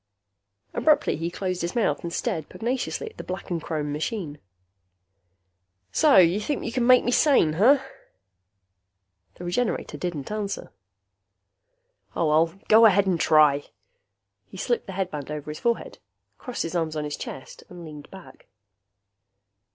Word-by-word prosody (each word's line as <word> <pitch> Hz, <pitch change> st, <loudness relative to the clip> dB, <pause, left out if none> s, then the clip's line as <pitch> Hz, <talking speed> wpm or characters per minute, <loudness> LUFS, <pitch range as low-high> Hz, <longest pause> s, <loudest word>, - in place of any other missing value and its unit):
Abruptly 305 Hz, -2 st, +2 dB
he 165 Hz, +2 st, -3 dB
closed 185 Hz, 0 st, -3 dB
his 170 Hz, +5 st, -3 dB
mouth 205 Hz, -11 st, +1 dB
and 170 Hz, -, -4 dB
stared 170 Hz, -6 st, -3 dB
pugnaciously 255 Hz, -, -3 dB
at -, -, -27 dB
the -, -, -7 dB
black 185 Hz, 0 st, -6 dB
and 170 Hz, -2 st, -1 dB
chrome 150 Hz, -2 st, -3 dB
machine. 155 Hz, -1 st, -4 dB, 1.5 s
"So 305 Hz, -3 st, +4 dB
you 180 Hz, +2 st, +5 dB
think 275 Hz, +6 st, -3 dB
you 235 Hz, -, -3 dB
can 240 Hz, 0 st, 0 dB
make 255 Hz, -1 st, +7 dB
me 245 Hz, -, 0 dB
sane, 250 Hz, -, +4 dB
huh?" 260 Hz, -, +4 dB, 1.5 s
The -, -, -10 dB
Regenerator 195 Hz, +7 st, -2 dB
didn't 170 Hz, -3 st, -4 dB
answer. 210 Hz, -2 st, -4 dB, 1.4 s
"Oh, 165 Hz, -, +1 dB
well, 165 Hz, +4 st, +2 dB
go 225 Hz, +1 st, +8 dB
ahead 200 Hz, -1 st, +3 dB
and 180 Hz, -3 st, 0 dB
try." 150 Hz, -2 st, +4 dB, 0.8 s
He -, -, -12 dB
slipped 240 Hz, +5 st, -1 dB
the 195 Hz, -, -6 dB
headband 180 Hz, -7 st, -4 dB
over 150 Hz, 0 st, -5 dB
his 155 Hz, -, -8 dB
forehead, 235 Hz, -1 st, -2 dB, 0.4 s
crossed 250 Hz, -, -4 dB
his 165 Hz, -, -5 dB
arms 160 Hz, -2 st, -1 dB
on 150 Hz, -, -2 dB
his 150 Hz, -1 st, -4 dB
chest 135 Hz, -, -9 dB
and 175 Hz, -1 st, -10 dB
leaned 150 Hz, -2 st, -11 dB
back. 180 Hz, -9 st, -14 dB
180 Hz, 150 wpm, -25 LUFS, 155-225 Hz, 1.5 s, go